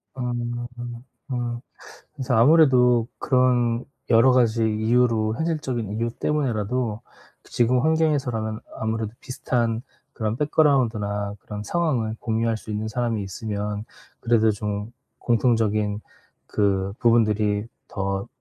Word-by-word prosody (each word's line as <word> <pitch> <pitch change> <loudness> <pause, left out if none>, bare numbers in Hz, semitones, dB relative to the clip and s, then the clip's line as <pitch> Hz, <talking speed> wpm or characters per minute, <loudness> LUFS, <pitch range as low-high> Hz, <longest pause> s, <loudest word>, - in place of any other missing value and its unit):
아. 125 -2 -2 0.9
아. 120 -3 -3 0.6
그래서 130 -3 -2
아무래도 125 -3 +5
그런 125 -2 +2 0.3
여러 115 +3 +6
가지 115 -2 +3
이유로 110 0 +2
현실적인 145 -9 -2
이유 115 +2 -1
때문에라도 120 -5 -1 0.4
지금 125 +1 +2
환경에서라면 135 -9 0 0.2
아무래도 110 -1 -2
비슷한 120 -3 -1 0.3
그런 110 -1 -2
백그라운드나 115 -9 +1
그런 105 -1 -7
상황을 120 -5 -1
공유할 115 0 0
수 110 - -10
있는 105 +1 -2
사람이 115 -1 -1
있으면 105 +1 -4 0.4
그래도 115 -2 +3
좀 105 +1 -4 0.3
공통적인 110 -3 +1 0.5
그 100 -1 0
부분들이 105 -3 +2 0.2
더 95 +1 -2
115 Hz, 270 characters per minute, -24 LUFS, 105-125 Hz, 0.9 s, 여러